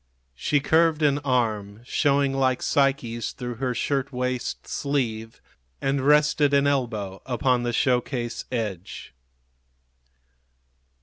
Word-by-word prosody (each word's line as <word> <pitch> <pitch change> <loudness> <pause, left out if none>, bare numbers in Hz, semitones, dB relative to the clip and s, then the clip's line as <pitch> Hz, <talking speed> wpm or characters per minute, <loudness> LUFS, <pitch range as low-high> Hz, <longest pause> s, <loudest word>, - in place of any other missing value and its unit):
She 145 - +1
curved 160 +1 +3
an 145 -1 +3
arm, 110 -6 -1
showing 140 0 +2
like 130 -1 +1
Psyche's 130 -5 0
through 120 -2 -6
her 125 0 -2
shirt 140 +2 -1
waist 125 -1 -3
sleeve, 115 -6 -2 0.4
and 135 0 0
rested 150 0 +4
an 140 0 +3
elbow 110 -9 -1
upon 125 0 +1
the 120 0 -1
show 125 +1 +2
case 120 -2 -5
edge. 105 -7 -5
130 Hz, 115 wpm, -25 LUFS, 120-140 Hz, 0.4 s, rested